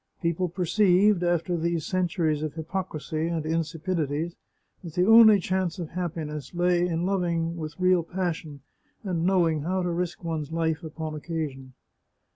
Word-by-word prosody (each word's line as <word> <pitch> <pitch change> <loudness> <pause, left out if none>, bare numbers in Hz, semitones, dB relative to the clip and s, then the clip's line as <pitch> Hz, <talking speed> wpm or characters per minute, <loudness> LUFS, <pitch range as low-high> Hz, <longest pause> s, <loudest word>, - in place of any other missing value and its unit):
People 170 +1 0
perceived, 185 +2 +3
after 175 0 +1
these 170 -1 -1
centuries 170 -4 0
of 155 -1 -4
hypocrisy 160 -2 -3
and 165 -2 -2
insipidities, 165 0 -2 0.5
that 165 -3 -8
the 180 - +3
only 220 -1 +8
chance 185 -1 -1
of 170 -4 -5
happiness 160 -4 -5
lay 175 0 +2
in 170 0 -1
loving 170 -3 0
with 155 -1 -7
real 185 -1 +4
passion, 165 -5 -4 0.4
and 175 -4 -1
knowing 170 -5 +2
how 185 +4 -1
to 175 - -1
risk 175 0 -3
one's 160 -3 -3
life 160 -1 0
upon 160 -1 -5
occasion. 150 -5 -5
170 Hz, 145 wpm, -26 LUFS, 160-180 Hz, 0.5 s, only